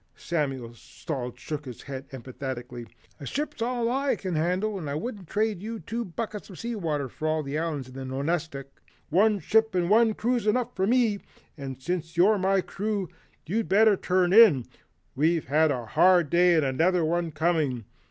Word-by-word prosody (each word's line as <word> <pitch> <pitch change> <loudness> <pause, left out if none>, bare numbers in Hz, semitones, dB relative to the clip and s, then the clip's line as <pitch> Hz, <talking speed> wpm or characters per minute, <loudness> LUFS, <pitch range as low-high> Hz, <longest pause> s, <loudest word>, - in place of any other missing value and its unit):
Samuel 135 -8 -3
Salt 125 0 -6
shook 150 +3 -5
his 125 -3 -9
head 135 -1 -7
emphatically. 125 -2 -7 0.3
"A 140 - -7
ship's 290 - -4
all 240 0 0
I 275 +2 +1
can 185 -2 -5
handle 185 +6 0
and 155 -5 -5
I 140 - -2
wouldn't 195 +2 -5
trade 210 -1 -1
you 225 +2 -5
two 230 +3 -4
buckets 210 +2 -6
of 185 - -11
sea 235 +1 -4
water 155 -8 -2
for 155 +5 -5
all 155 0 0
the 140 +2 -3
islands 155 -6 -3
in 130 - -13
the 135 0 -7
Nonestic. 140 +1 -3 0.4
One 210 +6 +3
ship 220 +1 +2
and 180 +1 +1
one 225 0 +4
crew's 240 -1 0
enough 245 +3 0
for 190 - 0
me, 230 -4 +2 0.4
and 135 -3 -7
since 170 +3 -4
you're 200 +4 +5
my 190 +1 +2
crew, 200 -1 -3 0.4
you'd 215 +7 -2
better 215 +1 +5
turn 185 -1 +1
in 195 - +7 0.5
we've 160 +4 +1
had 155 +4 +3
a 125 -5 -2
hard 175 +4 +4
day 175 0 +5
and 155 -3 +3
another 165 +6 +2
one 170 +1 0
coming. 155 -7 0
170 Hz, 180 wpm, -26 LUFS, 140-210 Hz, 0.5 s, in